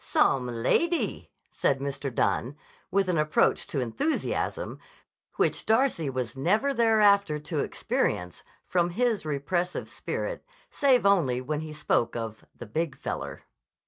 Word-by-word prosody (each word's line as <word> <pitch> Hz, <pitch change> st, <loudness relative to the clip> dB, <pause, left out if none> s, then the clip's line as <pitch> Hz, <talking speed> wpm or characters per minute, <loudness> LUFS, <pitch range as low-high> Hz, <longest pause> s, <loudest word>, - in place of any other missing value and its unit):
"Some 130 Hz, -2 st, +2 dB
lady!" 125 Hz, -, 0 dB, 0.2 s
said 135 Hz, -, +1 dB
Mr. 140 Hz, 0 st, -3 dB
Dunne 125 Hz, +3 st, 0 dB, 0.3 s
with 195 Hz, 0 st, +2 dB
an 175 Hz, -3 st, +1 dB
approach 155 Hz, 0 st, +2 dB
to 140 Hz, -, -2 dB
enthusiasm 125 Hz, -, -2 dB, 0.6 s
which -, -, +1 dB
Darcy 220 Hz, -, +2 dB
was 125 Hz, -3 st, -3 dB
never 210 Hz, -, +2 dB
thereafter 210 Hz, -, +4 dB
to 150 Hz, +1 st, -4 dB
experience 90 Hz, -9 st, -1 dB, 0.2 s
from 175 Hz, -1 st, +1 dB
his 220 Hz, -2 st, 0 dB
repressive 175 Hz, +5 st, -1 dB
spirit, -, -, -4 dB, 0.3 s
save 260 Hz, -6 st, +3 dB
only 165 Hz, -11 st, +3 dB
when 145 Hz, +4 st, -3 dB
he 155 Hz, 0 st, -6 dB
spoke 135 Hz, -6 st, 0 dB
of 110 Hz, -2 st, -5 dB
the -, -, -8 dB
"Big 155 Hz, +5 st, -2 dB
Feller." -, -, -5 dB
155 Hz, 130 wpm, -27 LUFS, 135-200 Hz, 0.6 s, thereafter